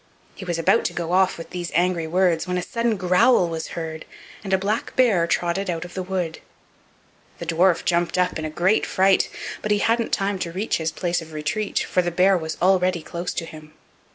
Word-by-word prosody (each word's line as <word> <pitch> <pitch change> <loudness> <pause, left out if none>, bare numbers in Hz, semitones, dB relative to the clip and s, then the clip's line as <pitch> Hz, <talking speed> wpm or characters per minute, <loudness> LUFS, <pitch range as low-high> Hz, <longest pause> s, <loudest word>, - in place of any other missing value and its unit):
He 190 - -9
was 175 -2 -2
about 165 - +3
to - - -1
go 170 0 -3
off 190 +1 +3
with 165 - -9
these 175 -2 -5
angry 175 -1 +1
words 175 0 +1
when 180 0 -1
a 180 - -2
sudden 230 +2 -1
growl 180 +3 +4
was 165 0 -5
heard, 160 -1 -5 0.4
and 195 - -5
a 190 - +4
black 205 +4 -2
bear 210 -10 +3
trotted 175 +3 -1
out 170 0 -3
of 175 - -11
the 190 - -3
wood. 180 -3 -3 1.0
The 170 - -6
dwarf 170 +2 +2
jumped 175 0 +1
up 180 -2 +1
in 155 0 -3
great 180 +7 +1
fright, 190 0 +3 0.3
but 215 - -3
he 210 - +3
hadn't 230 +2 +1
time 195 0 0
to 170 - -3
reach 195 +6 -1
his 160 -1 -2
place 175 +1 -1
of 160 -1 -11
retreat, 155 +8 -2
for 180 - +2
the 175 - -1
bear 185 +3 +3
was 160 -3 -3
already 185 -2 +2
close 170 +3 -4
to 165 - -3
him. 155 -2 -12
180 Hz, 210 wpm, -23 LUFS, 165-190 Hz, 1.0 s, growl